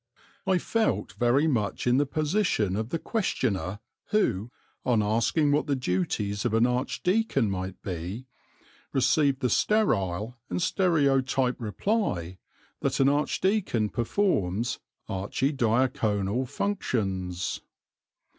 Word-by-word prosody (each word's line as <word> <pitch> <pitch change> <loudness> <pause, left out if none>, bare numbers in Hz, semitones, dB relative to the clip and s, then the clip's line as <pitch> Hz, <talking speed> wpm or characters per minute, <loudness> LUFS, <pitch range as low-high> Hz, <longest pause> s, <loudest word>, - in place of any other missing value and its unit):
I 190 - +4
felt 225 +4 0
very 125 +5 +2
much 115 -10 0
in 125 +1 +4
the 145 0 +2
position 155 - +1
of 110 +2 -2
the 165 - -1
questioner 115 - -1 0.3
who, 115 - +1 0.3
on 115 -4 +2
asking 115 +8 +2
what 150 +2 +1
the 140 - +1
duties 100 -2 -1
of 115 -2 0
an 115 +1 +4
archdeacon 130 - +1
might 95 0 -4
be, 95 +7 -5 0.7
received 140 0 +2
the 125 - +1
sterile 110 - +1
and - - -1
stereotyped 135 -8 +2
reply 105 - -1 0.4
that - - -1
an 135 0 +5
archdeacon 150 - +1
performs 115 - 0 0.3
archidiaconal 115 0 0
functions. 95 - -2
125 Hz, 110 wpm, -27 LUFS, 100-150 Hz, 0.7 s, an